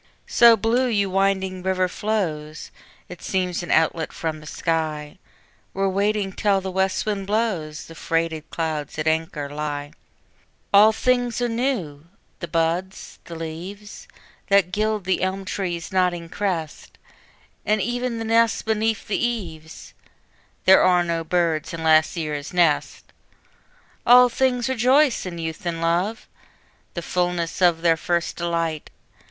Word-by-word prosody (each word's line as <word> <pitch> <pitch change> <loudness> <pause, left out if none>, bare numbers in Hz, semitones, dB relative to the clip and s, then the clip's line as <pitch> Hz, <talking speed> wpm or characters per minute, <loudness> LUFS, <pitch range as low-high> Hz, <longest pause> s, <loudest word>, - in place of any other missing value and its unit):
So 235 -1 +6
blue 235 +5 +1
you 200 -5 0
winding 190 -1 0
river 185 0 +1
flows, 165 -7 -3 0.4
It 180 - -11
seems 180 -2 -1
an 175 - -8
outlet 160 0 +1
from 160 -2 -4
the 155 - -13
sky, 155 -1 -3 0.5
Where 195 0 0
waiting 200 0 0
till 200 0 +1
the 190 0 -5
west 190 0 0
wind 200 -2 -2
blows, 195 -8 -2
The 165 - -12
freighted 165 -1 -2
clouds 155 -3 -3
at 155 - -2
anchor 160 -2 -1
lie. 145 0 -5 0.8
All 210 +2 +8
things 245 +1 0
are 245 - +1
new; 230 - -2 0.3
the 170 - -5
buds, 170 +3 -2
the 170 - -8
leaves, 175 +6 -8 0.4
That 195 -3 +3
gild 215 0 -1
the 185 0 0
elm 190 +1 -2
tree's 175 -4 -4
nodding 180 -3 0
crest, 175 -6 -4 0.7
And 215 0 +1
even 240 +3 -2
the 225 - -4
nest 230 0 +2
beneath 220 0 0
the 215 - -1
eaves; 165 -10 -5 0.7
There 190 - +7
are 180 -1 +4
no 170 -1 -2
birds 165 -2 0
in 165 - -6
last 160 +2 +4
year's 150 -1 -4
nest! 165 -4 +1 0.9
All 250 +1 +8
things 250 -1 0
rejoice 260 -1 +3
in 175 -2 -6
youth 160 -1 -5
and 170 -2 -3
love, 175 +7 -1 0.7
The 170 - -4
fulness 175 -1 -2
of 170 -2 +3
their 165 -1 +4
first 170 +1 -1
delight! 165 -2 -2
180 Hz, 140 wpm, -23 LUFS, 165-210 Hz, 0.9 s, All